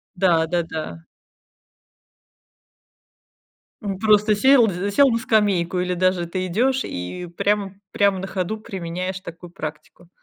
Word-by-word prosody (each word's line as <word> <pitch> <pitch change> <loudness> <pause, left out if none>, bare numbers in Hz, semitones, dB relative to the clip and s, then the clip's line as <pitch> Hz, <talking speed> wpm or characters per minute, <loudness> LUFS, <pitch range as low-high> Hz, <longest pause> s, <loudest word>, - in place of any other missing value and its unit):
Да-да-да. 165 -3 0 2.8
М, 200 -3 -3
просто 210 0 +4
сел 250 +1 +5
зе 190 +2 -3
сел 275 +6 +5
на 230 - +1
скамейку 200 -6 +1
или 180 0 -1
даже 185 -1 +1
ты 185 +2 -3
идёшь 255 +8 +1
и 90 - -6
прямо 200 -1 0 0.2
прямо 200 -2 +2
на 190 - -5
ходу 190 +2 -3
применяешь 185 -2 -5
такую 170 -1 -10
практику. 155 0 -9
185 Hz, 115 wpm, -22 LUFS, 175-210 Hz, 2.8 s, сел